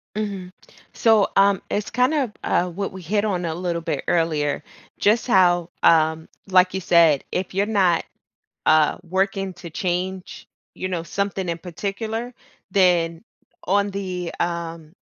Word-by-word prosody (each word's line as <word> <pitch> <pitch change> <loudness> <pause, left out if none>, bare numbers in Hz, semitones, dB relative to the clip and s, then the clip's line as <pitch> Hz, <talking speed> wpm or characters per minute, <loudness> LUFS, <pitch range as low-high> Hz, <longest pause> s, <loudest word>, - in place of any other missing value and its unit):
Mhm. 200 -4 -4 0.4
So, 220 -3 +4
um, 195 -1 +4
it's 210 +1 -2
kind 250 +5 +2
of, 270 -8 0
uh, 180 +1 +1
what 195 +3 -4
we 190 - -8
hit 205 +5 0
on 185 -4 -1
a 165 -2 -2
little 170 -1 -3
bit 155 -4 -3
earlier, 155 -4 0 0.3
just 220 +4 +2
how, 175 -5 +4
um, 160 -1 +3 0.2
like 185 -1 +4
you 190 - -1
said, 165 -5 +4
if 185 0 -2
you're 195 +1 +1
not, 190 -6 +2 0.6
uh, 155 -1 +4
working 195 +1 -1
to 175 - -10
change, 185 +1 -4 0.3
you 185 - -4
know, 175 -3 -2
something 195 +1 -3
in 170 - -3
particular, 215 +7 -4 0.4
then 175 -3 +2 0.4
on 200 +2 +1
the, 185 -3 -4
um, 170 -1 -4
185 Hz, 145 wpm, -22 LUFS, 170-200 Hz, 0.6 s, So